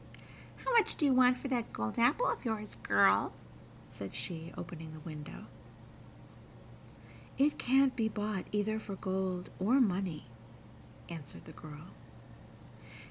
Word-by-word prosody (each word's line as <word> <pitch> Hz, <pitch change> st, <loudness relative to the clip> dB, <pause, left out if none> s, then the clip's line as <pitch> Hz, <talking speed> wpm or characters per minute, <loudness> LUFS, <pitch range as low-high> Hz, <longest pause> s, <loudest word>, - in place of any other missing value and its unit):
"How -, -, +1 dB
much 460 Hz, -4 st, +4 dB
do 300 Hz, -, +1 dB
you 275 Hz, -, +5 dB
want 255 Hz, 0 st, +6 dB
for -, -, -5 dB
that 240 Hz, -3 st, -1 dB
gold 110 Hz, -, -3 dB
apple 280 Hz, -, +4 dB
of 475 Hz, -, 0 dB
yours, 220 Hz, -3 st, -3 dB
girl?" 100 Hz, -2 st, +4 dB, 0.6 s
said 100 Hz, -1 st, -7 dB
she, 160 Hz, +8 st, -5 dB
opening 165 Hz, -2 st, -7 dB
the 155 Hz, -, -9 dB
window. 150 Hz, -1 st, -8 dB, 1.9 s
"It 290 Hz, +2 st, +3 dB
can't 265 Hz, +1 st, +4 dB
be 225 Hz, -2 st, +1 dB
bought 210 Hz, -3 st, -3 dB
either 210 Hz, +1 st, 0 dB
for 200 Hz, -2 st, -6 dB
gold 185 Hz, -1 st, -2 dB
or 230 Hz, +9 st, +4 dB
money," 185 Hz, -, +1 dB, 0.8 s
answered 160 Hz, -5 st, -9 dB
the -, -, -10 dB
girl. 155 Hz, +3 st, -10 dB
195 Hz, 135 wpm, -33 LUFS, 160-245 Hz, 1.9 s, want